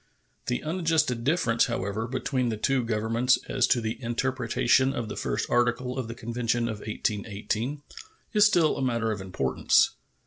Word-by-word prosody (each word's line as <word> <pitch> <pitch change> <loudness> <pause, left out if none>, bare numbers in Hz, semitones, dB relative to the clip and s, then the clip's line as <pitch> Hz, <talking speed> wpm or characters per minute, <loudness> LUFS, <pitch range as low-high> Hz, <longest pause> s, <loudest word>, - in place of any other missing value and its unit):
The 125 - -1
unadjusted 155 -7 0
difference, 135 -5 +2
however, 100 +4 -3
between 130 0 -1
the 110 - -2
two 130 +3 +1
Governments 115 +3 +1
as 130 -2 +2
to 125 - +3
the 110 +2 -4
interpretation 125 +1 +1
of 115 -2 -3
the - - -5
first - - -2
article 120 +1 +1
of 130 -3 -3
the 115 - -6
convention 120 +1 -1
of 110 -2 -4
1818 110 +6 -3 0.5
is 210 -1 +5
still 175 -7 +3
a - - -3
matter 115 -3 0
of 105 -2 -4
importance. 90 -9 +2
120 Hz, 160 wpm, -27 LUFS, 110-130 Hz, 0.5 s, is